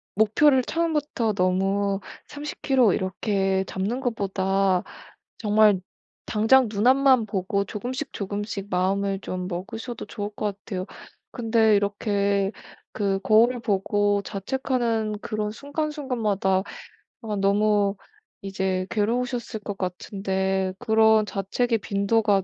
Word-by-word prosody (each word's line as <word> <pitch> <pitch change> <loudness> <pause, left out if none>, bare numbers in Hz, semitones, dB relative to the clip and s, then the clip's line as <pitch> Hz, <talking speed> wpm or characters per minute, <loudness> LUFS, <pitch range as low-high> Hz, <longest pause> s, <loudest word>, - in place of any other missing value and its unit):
목표를 255 +6 +4
처음부터 300 -8 -1
너무 195 +1 +1 0.3
30 295 0 -7
킬로 260 -6 +4
이렇게 190 0 0
잡는 205 +7 -2
것보다 195 -5 0 0.6
정말 210 -2 +4 0.5
당장 230 +3 +4
눈앞만 255 +2 +4
보고 200 0 -1
조금씩 245 +6 -5
조금씩 205 0 -4
마음을 195 +2 0
좀 185 -1 -4
먹으셔도 225 +7 -6
좋을 205 -2 -5
것 205 -2 -2
같아요. 190 -3 -5 0.5
근데 225 -2 +3
이렇게 200 -1 0 0.4
그 200 -2 0
거울을 230 +3 +4
보고 205 -1 +1
자책하는 225 0 -1
그런 215 -1 -3
순간순간마다 250 - -1 0.6
아 220 -3 -3
너무 200 0 +2 0.5
이제 190 -1 -2
괴로우셨을 235 +1 -1
것 205 -1 -6
같은데 190 0 -2
그런 220 -2 +4
자책의 225 +5 0
빈도가 200 0 +1
205 Hz, 250 characters per minute, -25 LUFS, 195-230 Hz, 0.6 s, 목표를